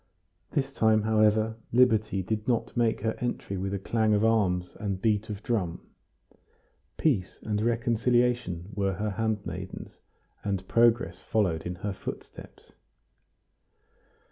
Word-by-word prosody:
This 135 -3 -1
time, 110 -3 +3
however, 110 0 +3
liberty 110 -5 +3
did 105 +3 -3
not 120 -3 0
make 115 -2 +1
her 110 0 0
entry 120 -5 -3
with 95 +1 -3
clang 110 -2 +2
of 105 +2 +2
arms 95 -6 +1
and 100 -3 -2
beat 110 0 +1
of 105 0 -6
drum, 95 -8 -2 1.1
peace 110 - 0
and 105 -1 -1
reconciliation 120 -5 +1
were 100 -1 0
her 105 +3 -2
handmaidens, 100 -3 -4 0.4
and 95 -2 -2
progress 120 0 +3
followed 90 -7 0
in 90 - -4
her 100 - -1
footsteps. - - -9
110 Hz, 120 wpm, -28 LUFS, 95-115 Hz, 1.1 s, time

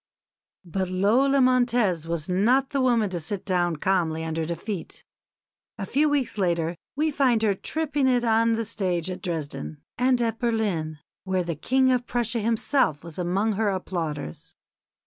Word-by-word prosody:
But 185 +2 -2
Lola 240 +9 +3
Montez 240 -9 +2
was 165 -2 -3
not 240 +10 +2
the 275 -2 0
woman 235 -6 +2
to 175 - -2
sit 180 +5 -5
down 175 -3 +1
calmly 160 -1 0
under 160 0 -2
defeat. 170 +2 -6 0.7
A 200 - -4
few 295 +8 +2
weeks 275 -7 -1
later 170 -2 0 0.2
we 310 +2 +1
find 255 -6 +2
her 210 -2 +3
tripping 290 +5 -1
it 250 -2 +2
on 230 0 +3
the 225 0 -1
stage 185 -5 -2
at 180 - -6
Dresden, 145 - -4 0.2
and 250 0 +3
at 230 -1 -1
Berlin, 205 -10 -1 0.3
where 190 -1 0
the 170 0 -3
King 260 - +2
of 245 -1 0
Prussia 235 -1 -1
himself 225 - +1
was 170 0 -9
among 190 +5 +1
her 210 0 0
applauders. 165 - -4
205 Hz, 160 wpm, -25 LUFS, 170-245 Hz, 0.7 s, Lola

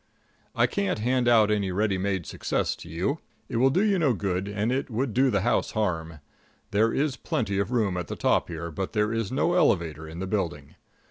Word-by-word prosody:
I - - +4
can't 200 -2 -1
hand 125 +3 +1
out 110 -3 +5
any 100 -3 0
ready 100 0 0
made 95 -3 -1
success - - -1
to - - -11
you. 95 - -1 0.3
It - - -3
would 130 +3 +3
do 190 - +4
you 200 -3 +2
no 140 -8 +2
good, 95 -1 -2
and 105 +3 -1
it 135 +2 -1
would 120 +1 -1
do 130 +3 +4
the 100 -5 +1
house 120 +5 +1
harm. 80 -7 -2 0.5
There 110 +3 +3
is 140 -2 0
plenty 100 -4 -1
of 100 - 0
room 110 -7 +1
at 90 -2 -3
the - - -4
top - - +2
here, 85 0 -5
but 95 +4 -4
there 105 0 +1
is 115 -1 -2
no 165 +6 +1
elevator 80 - +1
in 80 +1 -9
the 95 - -3
building. 85 -7 -3
105 Hz, 215 wpm, -26 LUFS, 90-125 Hz, 0.5 s, out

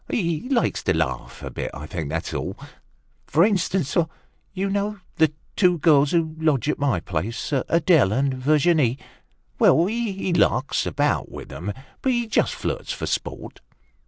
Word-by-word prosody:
He 170 - -1
likes 250 -4 +1
to 95 - +2
laugh 70 -6 -3
a - - -5
bit, - - -4
I 75 - -7
think, 80 -2 -4
that's 80 +2 -3
all. - - -4 0.7
For 160 +4 +4
instance, 185 -6 0 0.6
you 195 +1 -2
know 200 +1 -1 0.2
the 160 -2 +4 0.2
two 180 -3 +4
girls 145 -3 +4
who 160 -1 0
lodge 150 -4 +1
at 150 - 0
my 140 -10 +1
place, 90 - -4
Adele 155 - +3
and 135 +4 +1
Virginie. 145 -1 +2 0.6
Well, 165 - +5
he 200 -4 -2
larks 130 -5 +2
about - - 0
with - - -9
'em, 95 +5 -4 0.3
but 265 - +1
he 240 -1 0
just 220 - +1
flirts - - -3
for - - -4
sport." - - -4
155 Hz, 160 wpm, -23 LUFS, 130-185 Hz, 0.7 s, Well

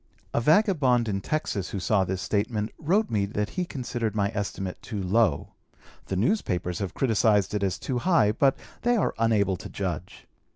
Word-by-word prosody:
A - - +1
vagabond 145 - +3
in 100 -2 -1
Texas 105 -8 -2
who 100 - -4
saw 95 +2 +2
this 95 0 -3
statement 105 +1 -1
wrote 190 +8 +1
me 100 -3 +1
that 105 +1 -2
he 180 - -2
considered 120 - -3
my 100 -1 +1
estimate 95 -2 -4
too 105 -4 -5
low. 95 -5 +2 0.6
The 95 - -2
newspapers 90 - 0
have 100 -3 -4
criticised 110 -5 +2
it 105 - -1
as 95 -1 0
too 125 +4 -2
high, 165 - +3
but 135 +5 +2 0.2
they 240 0 +2
are - - +1
unable 105 -5 +2
to - - -9
judge. - - -5
105 Hz, 175 wpm, -26 LUFS, 100-130 Hz, 0.6 s, vagabond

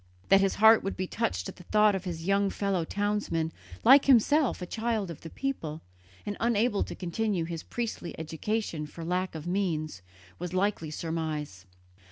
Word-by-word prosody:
That 195 0 +7
his 195 -1 +1
heart 220 +1 +7
would 195 - -3
be 185 - -1
touched 95 - -2
at - - -8
the 180 - -12
thought 210 +1 +4
of 190 -1 -3
his 165 -2 -5
young 200 +1 +2
fellow 195 -3 -1
townsman, 205 -5 -1 0.3
like 270 +3 +8
himself 275 +2 +4
a 180 - -4
child 220 -2 -2
of 165 - -10
the 165 - -8
people, 160 - -4 0.4
and 205 - -3
unable 230 -2 +2
to - - -7
continue 185 0 -1
his 165 -1 -5
priestly 230 -7 -5
education 160 0 -3
for 165 +2 -8
lack 180 +1 -1
of 155 0 -6
means, 170 - -1 0.4
was 180 0 -5
a - - 0
likely 190 -5 0
surmise. 155 - -4
185 Hz, 180 wpm, -29 LUFS, 165-210 Hz, 0.4 s, like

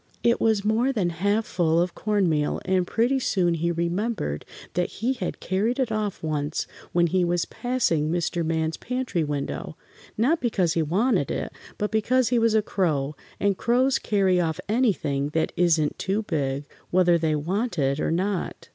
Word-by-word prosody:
It 235 0 +3
was 220 -3 +2
more 230 +5 +2
than 195 -9 0
half 205 +6 0
full 165 -2 +1
of 175 0 0
corn 210 -3 +1
meal, 150 -2 0
and 185 -1 +1
pretty 245 +4 +1
soon 180 -8 +1
he 170 +1 0
remembered 170 - -2 0.3
that 180 0 0
he 245 +4 -1
had 210 -9 -4
carried 210 +6 0
it 260 -4 0
off 215 -4 -2
once 150 -1 -2 0.3
when 175 0 +3
he 180 +2 +2
was 175 0 +1
passing 240 -12 0
Mr. 170 0 -1
Man's 160 0 -1
pantry 250 -9 -2
window, 145 +1 -4 0.4
not 275 +10 +2
because 190 -9 +1
he 165 - +1
wanted 185 - +1
it, - - -3 0.2
but 210 - -2
because 235 +3 +2
he 245 -1 +3
was 225 -1 +3
a 215 - +3
crow, 155 -8 0 0.2
and 200 -2 +1
crows 255 +3 +2
carry 190 -4 +2
off 160 -2 -1
anything 160 - +1
that 160 - +1
isn't 165 -4 +2
too 200 +3 -1
big, 140 -6 -2 0.2
whether 175 -1 +4
they 155 -1 +1
want 185 +8 -2
it 140 0 +1
or - - 0
not. 185 +3 -2
180 Hz, 175 wpm, -25 LUFS, 160-220 Hz, 0.4 s, whether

